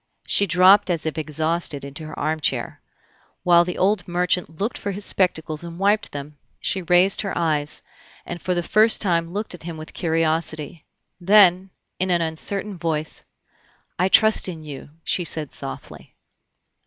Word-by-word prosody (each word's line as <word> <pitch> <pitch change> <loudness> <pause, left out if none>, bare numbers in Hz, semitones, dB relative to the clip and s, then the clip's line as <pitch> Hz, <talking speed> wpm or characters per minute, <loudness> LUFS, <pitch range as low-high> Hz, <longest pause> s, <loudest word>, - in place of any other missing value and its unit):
She 200 - +2
dropped 185 +3 +5
as 165 -3 -1
if 160 0 -2
exhausted 155 -1 -2
into 140 +3 -8
her 155 - -9
armchair. 155 0 -2 0.6
While 175 -1 +5
the 180 0 -5
old 195 0 +1
merchant 175 -2 -1
looked 210 +5 -2
for 200 - -5
his 200 +2 -4
spectacles 160 -4 +1
and 170 0 -8
wiped 205 +3 +1
them, 145 0 -8 0.2
she 190 - -2
raised 180 +2 +4
her 195 - -4
eyes, 150 -3 +1 0.4
and 175 -1 -7
for 180 -1 -1
the 175 - -1
first 220 +5 +4
time 170 -4 0
looked 205 +2 -1
at 180 - -10
him 165 -1 -7
with 155 0 -10
curiosity; 160 -2 -1 0.3
then, 190 0 +5 0.3
in 185 - 0
an 175 -2 +2
uncertain 190 +4 -4
voice, 155 -2 -3 0.8
"I 185 +1 +2
trust 220 -1 +4
in 160 -3 -8
you," 145 -2 -9
she 180 - -1
said 155 -3 -5
softly. 135 -1 -9
170 Hz, 160 wpm, -22 LUFS, 155-185 Hz, 0.8 s, dropped